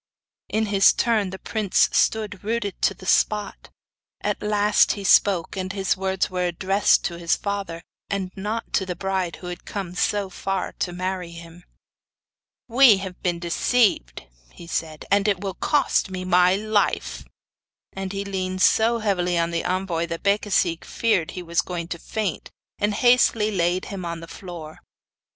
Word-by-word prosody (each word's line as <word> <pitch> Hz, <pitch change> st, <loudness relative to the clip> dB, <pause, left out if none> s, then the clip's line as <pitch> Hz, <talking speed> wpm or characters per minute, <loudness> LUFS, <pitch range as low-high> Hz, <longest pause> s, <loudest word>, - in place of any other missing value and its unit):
In 220 Hz, +1 st, 0 dB
his 200 Hz, -2 st, +5 dB
turn, 220 Hz, -5 st, +1 dB
the 190 Hz, -, -7 dB
prince 210 Hz, -1 st, +1 dB
stood 210 Hz, -3 st, 0 dB
rooted 215 Hz, -2 st, -3 dB
to 195 Hz, -, +2 dB
the 185 Hz, -, -13 dB
spot. 210 Hz, +2 st, 0 dB, 0.5 s
At -, -, -2 dB
last 210 Hz, 0 st, +3 dB
he 200 Hz, -, -7 dB
spoke, 195 Hz, -3 st, +3 dB
and 185 Hz, -1 st, -3 dB
his 195 Hz, -1 st, 0 dB
words 190 Hz, 0 st, -1 dB
were 180 Hz, -1 st, -1 dB
addressed 190 Hz, +4 st, +2 dB
to 170 Hz, -1 st, -3 dB
his 170 Hz, -1 st, +1 dB
father, 200 Hz, -5 st, -4 dB, 0.3 s
and 195 Hz, -2 st, -2 dB
not 210 Hz, +4 st, -4 dB
to 190 Hz, -, +1 dB
the 180 Hz, -, -3 dB
bride 190 Hz, -1 st, -2 dB
who -, -, -12 dB
had 180 Hz, 0 st, -6 dB
come 190 Hz, -4 st, -5 dB
so 195 Hz, +1 st, 0 dB
far 195 Hz, +1 st, -3 dB
to 180 Hz, -, -1 dB
marry 180 Hz, -1 st, -4 dB
him. 170 Hz, +1 st, -12 dB, 1.0 s
'We 245 Hz, -3 st, +6 dB
have 190 Hz, -2 st, -7 dB
been 175 Hz, -2 st, 0 dB
deceived,' 170 Hz, -, +1 dB, 0.3 s
he 170 Hz, -, -12 dB
said, 160 Hz, -2 st, -4 dB
'and 200 Hz, +1 st, +3 dB
it 200 Hz, -3 st, +1 dB
will 195 Hz, -2 st, -3 dB
cost 290 Hz, -, +1 dB
me 185 Hz, -1 st, -5 dB
my 180 Hz, 0 st, +4 dB
life.' 210 Hz, 0 st, -1 dB, 0.7 s
And 195 Hz, -1 st, -5 dB
he 200 Hz, 0 st, -4 dB
leaned 185 Hz, -1 st, -2 dB
so 225 Hz, +3 st, +4 dB
heavily 180 Hz, -5 st, 0 dB
on 170 Hz, 0 st, 0 dB
the 165 Hz, 0 st, -1 dB
envoy 180 Hz, -2 st, -1 dB
that 170 Hz, 0 st, -6 dB
Becasigue 200 Hz, -4 st, +1 dB
feared 205 Hz, -8 st, 0 dB
he 180 Hz, -, -4 dB
was 170 Hz, 0 st, +1 dB
going 170 Hz, -2 st, -5 dB
to 170 Hz, -, -5 dB
faint, 210 Hz, -2 st, -4 dB, 0.3 s
and 205 Hz, 0 st, 0 dB
hastily 235 Hz, -3 st, +4 dB
laid 180 Hz, -1 st, 0 dB
him 195 Hz, -2 st, -6 dB
on 170 Hz, -1 st, -4 dB
the 165 Hz, -, -10 dB
floor. 165 Hz, -4 st, -9 dB
190 Hz, 170 wpm, -23 LUFS, 175-205 Hz, 1.0 s, We